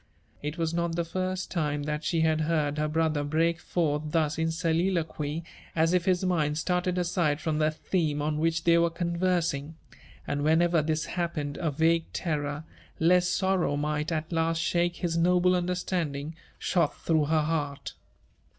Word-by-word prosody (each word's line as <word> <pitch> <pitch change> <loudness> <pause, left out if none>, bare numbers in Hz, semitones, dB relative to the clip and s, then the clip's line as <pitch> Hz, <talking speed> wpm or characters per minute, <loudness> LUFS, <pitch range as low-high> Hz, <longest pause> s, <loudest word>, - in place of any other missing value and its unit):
It 150 +3 -4
was 165 -1 -1
not 170 -1 -1
the 170 0 -1
first 185 +2 -3
time 150 -4 -1
that 150 +1 -3
she 165 -2 +1
had 160 -1 +2
heard 150 -2 0
her 150 - +1
brother 155 -1 +1
break 165 +3 +1
forth 155 -4 0
thus 155 0 0
in 160 0 +1
soliloquy, 165 -2 -1 0.3
as 165 +1 +3
if 180 -1 +2
his 185 -1 +2
mind 155 -5 +1
started 180 +2 0
aside 170 -4 +1
from 155 -2 -1
the 155 0 +3
theme 155 -1 -1
on 150 +1 -1
which 165 0 +1
they 170 0 +5
were 170 0 +3
conversing; 170 -3 -1 0.5
and 145 - -2
whenever 165 +2 +3
this 155 0 -1
happened, 160 -5 -3
a 165 - -1
vague 165 +3 +1
terror, 150 -3 -2 0.4
lest 180 +2 +3
sorrow 190 -6 +1
might 150 +2 -1
at 160 0 -2
last 165 0 +1
shake 175 +1 +1
his 170 -2 -2
noble 180 +1 +4
understanding, 175 -4 -2 0.2
shot 170 -5 0
through 160 -3 +2
her 155 +1 +2
heart. 150 -3 -2
165 Hz, 165 wpm, -28 LUFS, 150-175 Hz, 0.5 s, they